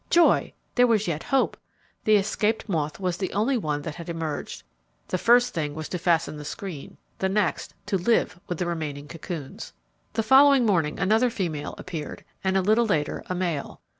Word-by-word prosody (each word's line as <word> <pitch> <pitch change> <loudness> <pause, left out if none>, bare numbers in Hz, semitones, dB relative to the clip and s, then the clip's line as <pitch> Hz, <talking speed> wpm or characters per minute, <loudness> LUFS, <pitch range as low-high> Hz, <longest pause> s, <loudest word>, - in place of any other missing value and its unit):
Joy! 345 -1 +4 0.2
There 245 -1 +5
was 215 -4 +2
yet 160 -2 -1
hope! 270 -1 +1 0.5
The 215 - +5
escaped 210 +2 0
moth 155 -5 -2
was 180 -2 -1
the 190 - -3
only 225 +7 +1
one 150 -10 -2
that 160 - -4
had 170 +2 -9
emerged. 160 -3 -4 0.5
The 185 - -1
first 245 +4 +4
thing 150 -3 -2
was 155 0 -5
to 180 - -3
fasten 165 -3 +1
the 150 - -7
screen, 155 -1 -7 0.2
the 190 - +1
next 195 -2 -1
to 200 -2 0
live 180 -2 +1
with 175 - -3
the 180 - -1
remaining 150 -4 -4
cocoons. 160 -3 -7 0.4
The 225 - 0
following 270 +2 +6
morning 170 -8 +1
another, 220 +5 +3
female 170 -10 -3
appeared, 165 -5 -7 0.2
and 190 0 +2
a 190 - +2
little 220 +4 +3
later 150 -8 0
a 185 - -1
male. 175 -6 -3
180 Hz, 185 wpm, -25 LUFS, 160-215 Hz, 0.5 s, following